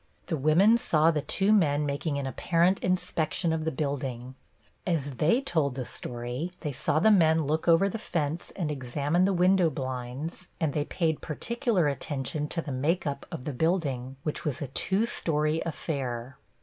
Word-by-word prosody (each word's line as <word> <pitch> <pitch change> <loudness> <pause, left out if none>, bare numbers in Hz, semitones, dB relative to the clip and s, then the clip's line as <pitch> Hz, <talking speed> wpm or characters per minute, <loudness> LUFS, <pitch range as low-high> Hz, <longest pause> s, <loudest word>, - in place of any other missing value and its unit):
The 165 - -1
women 170 - +4
saw 160 -8 +3
the 150 -2 -1
two 195 +8 +2
men 150 -7 +3
making 145 +1 -2
an 140 - -2
apparent 170 +8 +2
inspection 170 -2 0
of 160 -1 -2
the 160 - 0
building. 130 -3 -3 0.5
As 155 -6 -1
they 170 - +3
told 160 - 0
the 130 -2 -3
story, 120 +10 -4
they 150 - -2
saw 140 - -1
the 220 +8 +5
men 160 -5 +4
look 155 +4 -1
over 170 +4 +5
the 210 +3 -4
fence 165 -4 -2
and 165 -6 -2
examine 145 +6 0
the 195 - +2
window 180 -1 +4
blinds, 130 +5 -5
and 155 -4 0
they 145 -1 0
paid 160 -2 -1
particular 220 - 0
attention 145 +1 -2
to 165 +1 -2
the 145 - -5
make 150 +8 0
up 140 -1 -4
of 125 - -6
the 150 - -3
building, 135 -4 -1
which 150 - -3
was 145 -4 -2
a 145 - -4
two 195 - +1
story 155 -7 0
affair. 135 -5 -4
155 Hz, 175 wpm, -28 LUFS, 140-175 Hz, 0.5 s, the